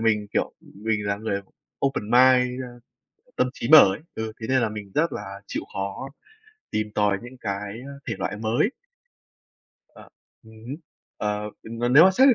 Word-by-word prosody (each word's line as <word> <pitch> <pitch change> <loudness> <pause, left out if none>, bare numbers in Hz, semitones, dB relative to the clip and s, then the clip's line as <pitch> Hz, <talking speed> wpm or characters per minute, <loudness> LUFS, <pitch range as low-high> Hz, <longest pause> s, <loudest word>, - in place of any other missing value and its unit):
mình, 105 -2 +2
kiểu, - - 0
mình 105 +1 -3
là 100 0 0
người 105 -2 -2 0.4
open-mind, 125 0 +3 0.6
tâm 125 - +2
trí 115 - -5
mở 155 0 +11
ấy, 100 - -6
ừ, 110 0 -4
thế 110 - -4
nên 130 -1 +3
là 115 - +2
mình 105 -2 -8
rất 165 +3 +2
là 100 -1 -6
chịu - - -3
khó 100 +7 -4 0.6
tìm 110 0 -1
tòi 100 -2 +2
những 120 +2 -10
cái, 100 0 -3
ờ, 140 - -8 0.2
thể 115 - -1
loại 105 - -2
mới. 115 - +1 1.2
Ờ, - - -13 0.4
ừm 110 0 -16
hứm, 140 +4 -5 0.4
ờ, 105 0 -2
v - - -22
và 120 - +2
nếu 145 +7 +8
mà 190 - +7
xét 265 +8 +6
về 255 - +7
110 Hz, 180 wpm, -25 LUFS, 105-130 Hz, 1.2 s, mở